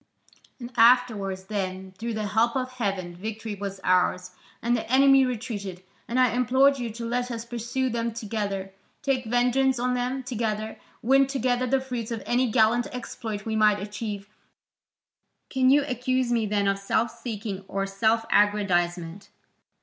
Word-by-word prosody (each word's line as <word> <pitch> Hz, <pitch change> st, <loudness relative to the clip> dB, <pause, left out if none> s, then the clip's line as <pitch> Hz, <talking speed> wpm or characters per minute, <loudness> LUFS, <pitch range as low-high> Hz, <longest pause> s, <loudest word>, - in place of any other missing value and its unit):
"And 240 Hz, 0 st, -8 dB
afterwards, 225 Hz, -6 st, +3 dB
when, 190 Hz, -2 st, -4 dB
through 225 Hz, +4 st, -5 dB
the 215 Hz, -1 st, -2 dB
help 230 Hz, +3 st, +2 dB
of 255 Hz, -1 st, -2 dB
heaven, 195 Hz, -8 st, -3 dB
victory 220 Hz, +3 st, -5 dB
was 200 Hz, -1 st, -5 dB
ours, 180 Hz, 0 st, +2 dB, 0.3 s
and 240 Hz, +1 st, +1 dB
the 230 Hz, 0 st, -4 dB
enemy 270 Hz, 0 st, +6 dB
retreated, 205 Hz, -7 st, -5 dB, 0.2 s
and 245 Hz, +2 st, 0 dB
I 255 Hz, -2 st, +4 dB
implored 260 Hz, +3 st, +3 dB
you 240 Hz, -2 st, -3 dB
to 235 Hz, +1 st, -6 dB
let 245 Hz, +1 st, -1 dB
us 230 Hz, -1 st, -5 dB
pursue 240 Hz, +2 st, -2 dB
them 235 Hz, -1 st, -1 dB
together, 205 Hz, -4 st, -4 dB, 0.3 s
take 265 Hz, -3 st, 0 dB
vengeance 250 Hz, +3 st, +2 dB
on 250 Hz, +1 st, 0 dB
them 250 Hz, +2 st, -2 dB
together, 220 Hz, -3 st, -3 dB, 0.2 s
win 270 Hz, +3 st, +4 dB
together 255 Hz, -2 st, 0 dB
the 270 Hz, +2 st, +2 dB
fruits 250 Hz, -4 st, -5 dB
of 230 Hz, -3 st, -4 dB
any 245 Hz, +1 st, +1 dB
gallant 230 Hz, +2 st, +3 dB
exploit 225 Hz, -4 st, -6 dB
we 220 Hz, -1 st, -2 dB
might 210 Hz, -1 st, +4 dB
achieve, 205 Hz, 0 st, -5 dB, 1.2 s
can 260 Hz, -1 st, +3 dB
you 285 Hz, +1 st, +5 dB
accuse 255 Hz, -1 st, 0 dB
me 230 Hz, -3 st, +1 dB
then 200 Hz, -1 st, +1 dB
of 195 Hz, 0 st, +1 dB
self 220 Hz, +3 st, 0 dB
seeking 215 Hz, -4 st, -6 dB
or 195 Hz, 0 st, -2 dB
self 220 Hz, +3 st, +1 dB
aggrandisement?" 185 Hz, -3 st, +1 dB
230 Hz, 155 wpm, -26 LUFS, 205-250 Hz, 1.2 s, enemy